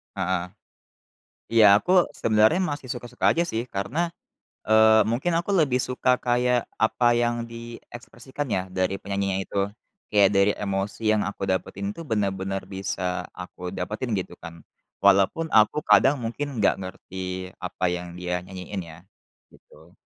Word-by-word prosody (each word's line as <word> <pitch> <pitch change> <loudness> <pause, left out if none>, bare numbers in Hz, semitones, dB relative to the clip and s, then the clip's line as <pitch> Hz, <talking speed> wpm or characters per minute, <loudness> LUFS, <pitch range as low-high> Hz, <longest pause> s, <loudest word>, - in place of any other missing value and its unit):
Heeh. 95 -2 -1 1.1
Iya 115 -2 +6 0.2
aku 180 - -5 0.3
sebenarnya 110 - +4
masih 145 -3 -6
suka-suka 120 0 -4
aja, 170 - +1
sih, 115 +2 -1
karena, 100 +11 -3 0.7
eee, 110 0 +6
mungkin 135 +10 0
aku 175 - -6
lebih 130 -5 +2
suka 125 0 -1 0.2
kayak 125 0 +2 0.2
apa 110 +2 +1 0.2
yang 120 0 +1
diekspresikan 120 +3 -8
ya 95 - 0 0.2
dari 95 +1 +1
penyanyinya 100 -1 -2
itu. - - -6 0.5
Kayak 100 -2 +5
dari 100 +1 +4
emosi 100 +1 -3
yang 105 -1 +2
aku 100 - -6
dapetin 100 +1 -2
itu 165 - -7
benar-benar 95 -4 -1
bisa 95 -1 -4 0.3
aku 90 0 -8
dapetin 110 +7 -4
gitu, 90 - -7
kan. 85 - -7 0.5
Walaupun 100 +11 +4
aku 110 +7 +4
kadang 130 +8 +6
mungkin 120 +6 -3
nggak - - +4
ngerti 95 0 -6
apa - - -7
yang 90 0 -6
dia 90 0 -3
nyanyiin 95 +1 -6
ya, 80 - -11 0.6
gitu. - - -20
105 Hz, 140 wpm, -25 LUFS, 95-120 Hz, 1.1 s, Iya